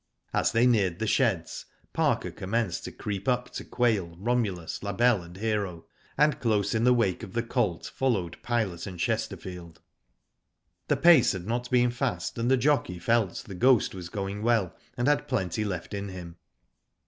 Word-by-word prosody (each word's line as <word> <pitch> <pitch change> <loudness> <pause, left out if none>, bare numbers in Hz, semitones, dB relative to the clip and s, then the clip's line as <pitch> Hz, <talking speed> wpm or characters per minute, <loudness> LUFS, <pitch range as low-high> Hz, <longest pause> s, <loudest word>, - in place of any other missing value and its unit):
As - - +2
they 115 +1 +3
neared 100 -8 +3
the 110 - -2
sheds, 100 -8 0 0.3
Parker - - +1
commenced 100 -2 -2
to - - -6
creep 100 -2 -5
up 125 -1 0
to - - -6
Quail, 105 -9 0
Romulus, 100 -5 -1
La 100 0 -3
Belle, 120 -1 +3
and 85 +1 -12
Hero, 100 -5 -2 0.3
and 150 -1 +3
close 110 -3 +1
in 110 +1 +1
the 125 - +6
w^ake 100 -7 +1
of 95 - -8
the 115 - 0
colt 115 -7 -1
followed 100 -11 -1
Pilot 110 -8 -1
and 90 -3 -8
Chesterfield. 85 -1 -3 1.1
The - - +2
pace 155 -10 +6
had 90 -2 -6
not 120 +3 -2
been 125 -1 +3
fast, 125 -1 -2
and 115 +2 +1
the 130 - +5
jockey 130 -8 +1
felt 110 +1 0
The 100 - -8
Ghost 125 +5 +3
was 90 -3 -7
going 100 +1 -4
well, 110 -5 +1 0.2
and 120 +2 0
had 145 0 +2
plenty 110 - -1
left 95 -4 -4
in 100 0 -4
him. 90 -2 -9
105 Hz, 175 wpm, -27 LUFS, 90-120 Hz, 1.1 s, the